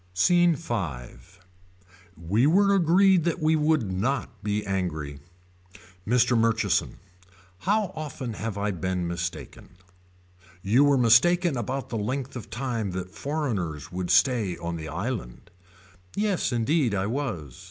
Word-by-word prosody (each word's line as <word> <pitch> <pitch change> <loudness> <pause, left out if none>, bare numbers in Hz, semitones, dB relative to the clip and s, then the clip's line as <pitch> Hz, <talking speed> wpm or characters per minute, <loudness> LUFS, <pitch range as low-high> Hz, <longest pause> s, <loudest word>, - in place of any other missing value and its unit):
SCENE 175 - +4
V. 165 -5 -5 1.4
We 100 - +1
were 200 +5 +4
agreed 185 0 +4
that 170 +1 0
we 160 0 +2
would 150 -9 +1
not 110 +2 -2
be 105 0 -1
angry. 80 -7 -3 0.9
Mr. 125 +1 +3
Murchison. 115 -4 +1 0.7
How 210 -2 +2
often 140 -7 -5
have 110 -1 -5
I 105 +1 -1
been 90 0 -2
mistaken. 85 -1 -6 0.9
You 115 +8 +4
were 140 -1 +4
mistaken 150 +8 +4
about 130 +3 -3
the 115 - -3
length 130 +6 -3
of 120 - -7
time 115 -4 -3
that 95 0 -5
foreigners 110 - -3
would 90 -1 -4
stay 115 -9 +2
on 85 0 -4
the 80 -1 -6
island. 90 - -5 0.6
Yes 205 -7 0
indeed 120 0 +1
I 95 0 0
was. 105 - -4
115 Hz, 130 wpm, -26 LUFS, 95-150 Hz, 1.4 s, SCENE